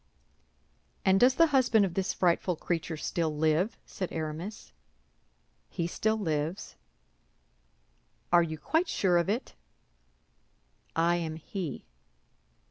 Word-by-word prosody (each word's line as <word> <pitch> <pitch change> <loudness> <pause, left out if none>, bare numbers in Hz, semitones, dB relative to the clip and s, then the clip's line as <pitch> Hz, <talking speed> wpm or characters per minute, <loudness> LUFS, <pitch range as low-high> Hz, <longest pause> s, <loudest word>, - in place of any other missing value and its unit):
"And 190 0 +5
does 250 +3 +5
the 330 - +6
husband 240 -6 +4
of 180 - -4
this 190 +1 0
frightful 180 0 +1
creature 165 0 -3
still 155 -1 -2
live?" 160 +7 +1
said 185 - -5
Aramis. 160 - -5 1.0
"He 170 - -2
still 220 +5 0
lives." 160 -1 -2 1.6
"Are 175 - +8
you 160 -2 -2
quite 320 - 0
sure 180 -3 +2
of 170 - -1
it?" 225 +5 -2 1.4
"I 170 +1 +3
am 160 -2 -3
he." 165 -1 -6
175 Hz, 115 wpm, -29 LUFS, 160-205 Hz, 1.6 s, Are